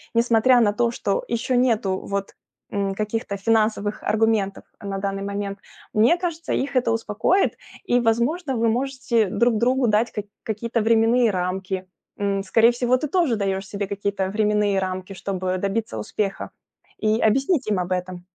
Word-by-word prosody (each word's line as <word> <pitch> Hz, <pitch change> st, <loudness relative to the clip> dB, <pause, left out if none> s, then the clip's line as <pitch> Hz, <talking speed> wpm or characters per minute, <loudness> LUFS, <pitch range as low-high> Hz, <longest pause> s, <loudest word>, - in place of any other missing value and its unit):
несмотря 235 Hz, +2 st, +4 dB
на 205 Hz, -2 st, +3 dB
то, 240 Hz, +1 st, +1 dB
что 200 Hz, -4 st, -1 dB
еще 235 Hz, +2 st, -1 dB
нету 220 Hz, -6 st, +1 dB
вот, 200 Hz, 0 st, -4 dB, 0.4 s
м, 195 Hz, -1 st, -1 dB
каких-то 210 Hz, -1 st, -3 dB
финансовых 215 Hz, 0 st, +1 dB
аргументов 215 Hz, -2 st, +1 dB, 0.2 s
на 200 Hz, -1 st, -4 dB
данный 195 Hz, 0 st, -3 dB
момент, 200 Hz, 0 st, -4 dB, 0.3 s
мне 230 Hz, +11 st, +4 dB
кажется, 335 Hz, -2 st, -3 dB
их 275 Hz, +1 st, -2 dB
это 245 Hz, -2 st, +2 dB
успокоит 225 Hz, -, +1 dB, 0.3 s
и 245 Hz, -, +2 dB
возможно 255 Hz, +7 st, 0 dB
вы 230 Hz, 0 st, +1 dB
можете 255 Hz, -2 st, 0 dB
друг 230 Hz, +3 st, +2 dB
другу 250 Hz, +1 st, +2 dB
дать 215 Hz, +3 st, +2 dB
как 210 Hz, -, -5 dB, 0.2 s
какие-то 230 Hz, +1 st, -2 dB
временные 230 Hz, +2 st, +4 dB
рамки, 185 Hz, +1 st, -3 dB, 0.3 s
м. 200 Hz, -1 st, 0 dB
Скорее 225 Hz, +4 st, +4 dB
всего, 245 Hz, +1 st, +1 dB
ты 300 Hz, -, -3 dB
тоже 320 Hz, -7 st, +2 dB
даешь 195 Hz, -1 st, -2 dB
себе 200 Hz, 0 st, -4 dB
какие-то 200 Hz, -1 st, -2 dB
временные 210 Hz, -1 st, +1 dB
рамки, 185 Hz, 0 st, -4 dB
чтобы 185 Hz, 0 st, -3 dB
добиться 200 Hz, -, -2 dB
успеха. 195 Hz, -, -3 dB, 0.5 s
И 215 Hz, +1 st, +1 dB
объяснить 270 Hz, -, +2 dB
им 210 Hz, -2 st, +1 dB
об 180 Hz, 0 st, -3 dB
этом. 180 Hz, -1 st, -3 dB
215 Hz, 155 wpm, -23 LUFS, 195-240 Hz, 0.5 s, несмотря